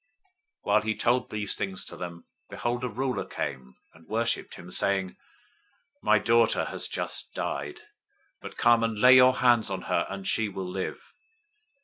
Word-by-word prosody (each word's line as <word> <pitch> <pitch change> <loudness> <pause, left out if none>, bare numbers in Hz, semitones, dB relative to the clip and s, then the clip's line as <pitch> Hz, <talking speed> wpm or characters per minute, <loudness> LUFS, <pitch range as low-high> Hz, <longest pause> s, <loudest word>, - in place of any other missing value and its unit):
009:018 - - -46 0.6
While 105 +1 +3
he 110 0 -2
told 125 +2 +1
these 105 -2 +1
things 95 -1 -3
to - - -5
them, 85 -1 -8 0.2
behold, 120 +1 -3
a - - 0
ruler 125 +3 -2
came 65 -2 -6 0.2
and 80 0 -20
worshiped 115 +1 -1
him, 90 - -11
saying, 95 -1 0 0.9
"My - - +4
daughter 115 0 +3
has - - -1
just - - -2
died, 75 +1 -4 0.6
but - - -10
come 120 -1 +4
and 115 -1 -1
lay 125 +4 +7
your 130 0 +6
hand 120 -3 +3
on 95 -1 -4
her, - - 0
and 100 -1 -6
she 110 -2 +1
will 95 -1 -6
live." 95 +1 -6
105 Hz, 165 wpm, -27 LUFS, 95-120 Hz, 0.9 s, lay